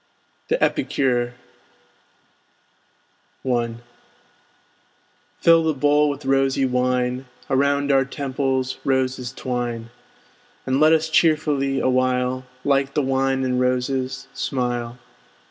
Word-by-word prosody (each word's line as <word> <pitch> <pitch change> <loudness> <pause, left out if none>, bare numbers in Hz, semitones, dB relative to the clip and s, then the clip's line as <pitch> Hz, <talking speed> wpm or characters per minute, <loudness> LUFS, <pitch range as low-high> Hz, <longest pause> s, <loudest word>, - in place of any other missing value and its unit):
THE 485 - +1
EPICURE 125 -2 0 2.1
I 120 -2 0 1.7
Fill 165 -1 +6
the 160 -2 0
bowl 145 +2 +3
with 145 0 -5
rosy 135 0 +2
wine! 125 0 0 0.2
Around 140 +1 +2
our 135 -1 +4
temples 130 -1 -2
roses 130 -2 0
twine! 120 -3 -4 0.7
And 130 +1 +1
let 155 +1 +6
us 160 0 +3
cheerfully 150 -4 +2
awhile, 130 0 0 0.2
Like 140 -1 +1
the 150 - +2
wine 135 0 0
and 125 -1 0
roses, 130 +1 -1
smile. 120 -2 -2
130 Hz, 95 wpm, -22 LUFS, 125-140 Hz, 2.1 s, Fill